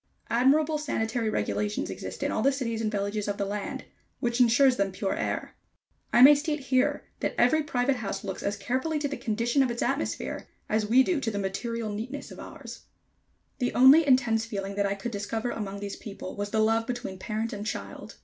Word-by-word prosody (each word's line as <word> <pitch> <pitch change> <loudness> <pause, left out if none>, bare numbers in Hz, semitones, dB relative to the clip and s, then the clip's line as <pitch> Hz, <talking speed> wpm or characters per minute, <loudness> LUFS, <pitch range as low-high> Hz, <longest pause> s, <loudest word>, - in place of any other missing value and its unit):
Admirable 295 +6 +3
sanitary 225 -6 -1
regulations 210 -1 -1
exist - - -6
in - - 0
all - - 0
the 275 - +4
cities 230 -5 -2
and 215 -1 -1
villages 205 0 -2
of 205 0 -2
the 200 - -1
land, 205 +1 -4 0.3
which 240 0 -1
insures 250 +2 +5
them 200 -1 0
pure 195 +1 -2
air. - - -3 0.6
I 240 - +6
may 285 +3 +11
state 300 +1 -1
here 275 +2 +1 0.2
that - - -2
every 280 +6 +4
private 260 -2 0
house 220 -5 -4
looks 195 -2 -5
as 205 +1 -2
carefully 260 +9 -1
to 295 -1 -1
the 280 - -4
condition 235 +4 0
of 260 - +2
its 235 0 -2
atmosphere, 275 +4 -2 0.2
as 215 0 0
we 250 +4 +6
do 345 +1 0
to 235 - -1
the 205 - -4
material 215 +3 -3
neatness 235 +7 -6
of - - -10
ours. - - -10 0.7
The 245 - -1
only 275 +5 +7
intense 245 -4 +3
feeling 200 -3 -4
that 200 0 +1
I 200 - -1
could 220 +4 -5
discover 220 +3 -3
among 200 -2 -5
these 200 -1 -5
people 200 -3 -8
was 205 0 -3
the 220 - -2
love 225 +1 +2
between 240 -6 -5
parent 220 +2 -3
and 205 0 -5
child. 215 - -6
230 Hz, 205 wpm, -27 LUFS, 205-260 Hz, 0.7 s, may